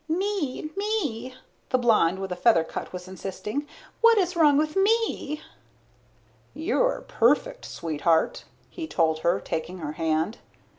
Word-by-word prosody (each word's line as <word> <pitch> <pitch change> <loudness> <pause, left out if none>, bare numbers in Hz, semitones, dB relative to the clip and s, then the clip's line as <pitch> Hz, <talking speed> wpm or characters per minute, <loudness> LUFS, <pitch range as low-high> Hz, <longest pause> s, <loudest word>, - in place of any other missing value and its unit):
"Me, 330 -4 -2
me," 295 - -2 0.3
the 255 - +3
blonde 215 -8 +3
with 190 -1 -5
a - - -1
feather 180 -2 +4
cut 160 - -6
was 180 0 -7
insisting. 195 - -5 0.3
"What 460 0 +6
is 365 -2 +1
wrong 300 -4 +5
with 305 +1 0
me?" 390 -7 +1 1.1
"You're 470 +10 +1
perfect, - - +2
sweetheart," 160 0 0 0.3
he 330 -3 -6
told 160 - +1
her, 170 +3 +1
taking 165 +3 -4
her 155 -4 -4
hand. 160 +6 -1
255 Hz, 135 wpm, -26 LUFS, -, 1.1 s, What